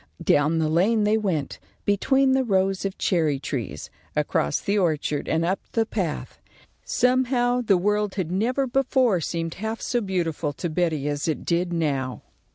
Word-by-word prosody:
Down 150 +3 +3
the 160 -1 +1
lane 195 +8 +2
they 210 +1 +3
went, 165 -10 -2 0.3
between 265 +7 +3
the 265 0 +3
rows 195 -3 +1
of 195 - -3
cherry 160 -6 +1
trees; 135 -5 -5 0.2
across 70 - +1
the 200 - -1
orchard 155 -6 0
and 160 +1 +1
up 190 +3 0
the 225 -1 +2
path. 185 -9 -4 0.4
Somehow 250 -1 +2
the 205 -5 +3
world 210 +2 0
had 180 -4 -2
never 245 +8 +1
before 255 -6 +2
seemed 165 +1 -3
half 220 +1 -3
so 240 -1 -1
beautiful 170 -6 -2
to 170 +3 -4
Betty 155 -4 0
as 145 +1 -2
it 160 - -2
did 175 +1 0
now. 140 -6 -1
185 Hz, 165 wpm, -24 LUFS, 160-220 Hz, 0.4 s, Down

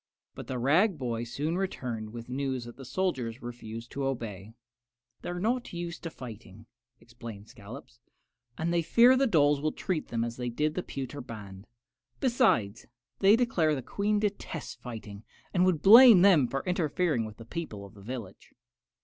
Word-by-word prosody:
But - - -9
the 130 - -3
rag 160 - +3
boy 120 -3 -3
soon 150 +9 -2
returned 120 - -4
with 115 +1 -8
the 125 - -8
news 130 -2 -2
that 120 - -10
the 135 - -11
soldiers 130 -6 -2
refused 115 -1 -8
to 140 - -4
obey. 115 -5 -5 0.7
"They - - -6
are 175 0 -4
not 240 +4 -1
used 170 0 -5
to 165 - -5
fighting," 110 -6 -11 0.3
explained 115 -3 -11
Scollops, 120 +1 -12 0.6
"and 170 +2 -1
they 170 - +2
fear 235 +9 +6
the 270 +1 +3
dolls 145 -7 +3
will 155 +1 0
treat 175 -1 -3
them 115 -1 -1
as 120 0 -4
they 125 -1 -3
did 150 +6 -1
the 180 - -2
pewter 140 -2 -6
band. 105 -4 -10 0.5
Besides, 115 - +1 0.3
they 200 +2 +6
declare 180 -11 +2
the 130 - -5
Queen 210 - 0
detests 205 -6 -3
fighting, 110 -4 -9 0.3
and 180 0 +3
would 175 -5 +1
blame 225 -2 +9
them 170 -10 +6
for 135 +2 -3
interfering 175 -6 0
with 110 -1 -8
the 115 - -11
people 115 -8 -6
of 100 - -14
the 100 - -15
village." 110 -3 -8
135 Hz, 175 wpm, -29 LUFS, 115-175 Hz, 0.7 s, blame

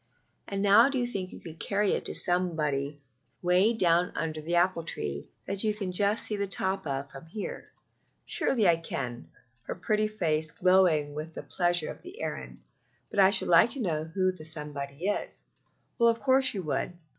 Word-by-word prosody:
"And 195 0 -3
now 210 +6 +6
do 275 - -2
you 245 - +1
think 195 -6 -4
you - - -10
could 165 -1 -10
carry 200 0 0
it - - -1
to - - 0
somebody 150 -5 +1 0.4
way 180 +5 +4
down 180 -5 +2
under 155 -1 -3
the 170 +3 -2
apple 175 -1 +2
tree 70 - -4 0.2
that 195 +2 -2
you 215 -1 +1
can 195 -4 -3
just 205 +4 +3
see 215 - -2
the 200 0 -1
top 190 -2 0
of 140 0 -3
from 135 +4 -11
here?" 200 +5 -7 0.6
"Surely 225 -7 +1
I 170 -1 +5
could," 125 -7 -5 0.4
her - - -4
pretty 215 0 0
face 160 -7 -1
glowing 175 -5 +3
with 155 +2 -7
the - - -6
pleasure 175 -3 0
of - - -12
the 375 +6 -11
errand, - - -6 0.5
"but - - -2
I 190 -1 +7
should 195 0 +3
like 170 +6 +6
to 255 - -2
know 155 -5 -1
who 185 +3 0
the 180 -4 -12
somebody 150 -1 -4
is." 205 - -3 0.5
"Of 230 -1 +4
course 260 -2 +3
you 190 - -3
would. 155 +3 -2
180 Hz, 190 wpm, -28 LUFS, 155-205 Hz, 0.6 s, I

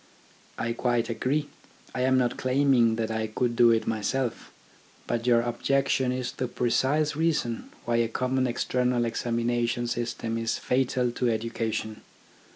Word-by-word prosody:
I 115 - -1
quite 120 -1 0
agree. 140 +6 -1 0.5
I 125 - -2
am 130 0 +3
not 125 -2 +1
claiming 130 -3 +3
that 115 -1 -2
I 110 0 -1
could 120 +2 -1
do 120 0 +6
it 115 -1 +2
myself. 115 +3 -2 0.5
But 115 +1 -2
your 120 -1 +5
objection 130 +2 +1
is 125 -1 -2
the 125 - -3
precise 140 +5 +1
reason 150 -7 -1 0.2
why 120 0 +1
a 115 0 +2
common 130 +3 0
external 125 0 0
examination 120 +1 -1
system 115 -1 -2
is 115 0 -1
fatal 125 -1 0
to 120 0 0
education. 110 -1 -2
120 Hz, 145 wpm, -27 LUFS, 115-130 Hz, 0.5 s, do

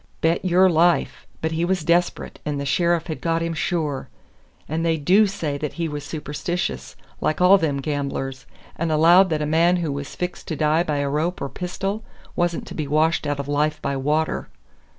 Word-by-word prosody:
"Bet 165 +1 +2
your 185 +1 +5
life! 175 0 +2
but 160 - -1
he 165 +1 -1
was 180 -1 0
desp'rate, 175 +2 0
and 150 -1 -2
the 140 - -3
sheriff 170 +2 +1
had 160 - -5
got 165 0 0
him 165 0 -2
sure! 155 -3 -2 0.6
And 160 +2 -2
they 165 -1 +2
DO 190 +8 +4
say 155 -7 -3
that 150 -1 -3
he 170 -1 -2
was 150 -2 -5
superstitious, 145 - -4 0.2
like 155 - 0
all 185 +2 +6
them 150 -5 0
gamblers, 135 -2 -3 0.3
and 165 0 -1
allowed 170 +5 +6
that 155 -2 0
a - - 0
man 165 +4 +3
who 170 -4 -1
was 140 0 -5
fixed 180 0 -5
to 160 - -2
die 155 +2 +2
by 150 -4 -1
a 145 0 0
rope 155 +6 -1
or - - -3
a - - -5
pistol 195 +4 -4 0.3
wasn't 175 -1 0
to - - -9
be 155 -3 -3
washed 155 +1 +2
out 145 -1 -1
of 140 - -4
life 150 +1 0
by 140 - -2
water." 150 +4 -1
160 Hz, 205 wpm, -23 LUFS, 145-175 Hz, 0.6 s, all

